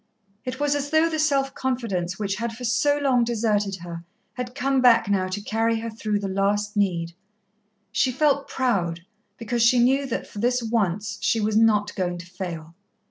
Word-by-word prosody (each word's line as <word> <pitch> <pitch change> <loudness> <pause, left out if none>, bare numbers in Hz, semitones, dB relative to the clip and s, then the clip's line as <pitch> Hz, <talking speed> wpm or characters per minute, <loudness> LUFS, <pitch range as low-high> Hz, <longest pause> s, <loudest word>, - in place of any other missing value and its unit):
It 255 +1 -4
was 290 0 +2
as 285 0 -2
though 315 +2 +4
the 315 - -2
self 275 -3 +1
confidence 210 -9 -2
which 200 -2 -2
had 230 +1 -3
for 250 - -8
so 260 +5 +2
long 265 -4 +2
deserted 210 -4 0
her 170 -1 -7 0.3
had 250 0 -6
come 270 0 +1
back 240 -3 +5
now 195 -2 +1
to 185 +2 -3
carry 225 +2 0
her 230 0 -4
through 215 -1 -2
the 200 - -2
last 205 +2 0
need. 170 -5 0 0.8
She 255 - +2
felt 280 +1 +1
proud, 180 -10 -1 0.4
because 235 +1 -2
she 230 +2 +5
knew 265 +3 +3
that 245 - -3
for 205 - -10
this 245 +2 +1
once 210 -3 -1
she 225 - +1
was 210 0 0
not 210 -2 +3
going 180 -2 -2
to 170 - -9
fail. 175 -3 -7
225 Hz, 190 wpm, -24 LUFS, 200-255 Hz, 0.8 s, back